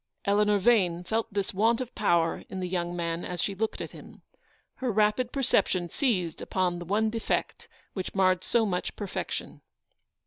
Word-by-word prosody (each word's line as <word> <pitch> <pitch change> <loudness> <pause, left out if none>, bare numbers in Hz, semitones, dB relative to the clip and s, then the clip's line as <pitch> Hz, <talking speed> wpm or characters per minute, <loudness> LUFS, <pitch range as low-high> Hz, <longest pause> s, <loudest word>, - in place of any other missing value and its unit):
Eleanor 205 0 +3
Yane 185 -5 +3
felt 225 +4 -1
this 200 -1 -2
want 225 +4 +3
of 250 -1 -5
power 170 -5 +2
in 190 - -5
the 180 - -2
young 175 -1 -2
man 170 0 -2
as 180 -1 -5
she 200 - 0
looked 220 +3 -2
at - - -5
him. - - -13 0.5
Her 255 -2 -1
rapid 215 +4 +2
perception 185 -9 +1
seized 185 - 0
upon 180 -2 0
the 175 - -7
one 215 +4 +1
defect 225 0 -2 0.3
which 185 -1 -5
marred 185 -2 +3
so 230 -2 +2
much 180 -3 -2
perfection. 200 -3 -5
195 Hz, 170 wpm, -28 LUFS, 180-220 Hz, 0.5 s, Eleanor